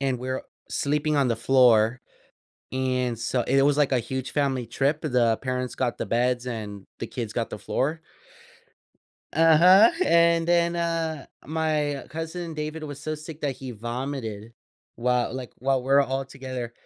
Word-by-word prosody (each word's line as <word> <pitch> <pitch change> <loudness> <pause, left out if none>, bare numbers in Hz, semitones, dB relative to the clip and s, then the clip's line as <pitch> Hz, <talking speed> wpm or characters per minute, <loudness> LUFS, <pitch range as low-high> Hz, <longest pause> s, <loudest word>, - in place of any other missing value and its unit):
and 135 -2 0
we're 130 +1 -3 0.3
sleeping 150 +1 0
on 140 -2 +3
the 115 - 0
floor, 120 -1 +4 0.7
and 130 -2 0
so 120 +2 0
it 135 +3 +2
was 145 +1 +3
like 145 -2 +2
a 130 - +3
huge 130 +2 -5
family 135 -4 0
trip, 140 +6 0
the 120 -6 +2
parents 125 -1 -2
got 125 -2 -1
the - - -3
beds 120 +1 +1
and 105 -5 -6
the - - -4
kids 115 -4 -5
got 115 0 -2
the - - -6
floor. 150 +9 -2 1.3
Uh-huh, 170 +7 +7
and 170 0 +4
then, 170 0 +2
uh, 165 -3 -2 0.2
my 150 -2 -1
cousin 165 +1 -5
David 155 +1 -4
was 145 -1 -7
so 155 +1 -3
sick 155 0 -9
that 140 -3 -2
he 130 -2 -7
vomited, 120 -1 -5 0.4
while 125 0 0
like, 130 -2 -6
while 135 0 +1
we're 135 +2 +4
all 135 0 -1
together, 130 -3 -6
135 Hz, 160 wpm, -25 LUFS, 125-155 Hz, 1.3 s, Uh-huh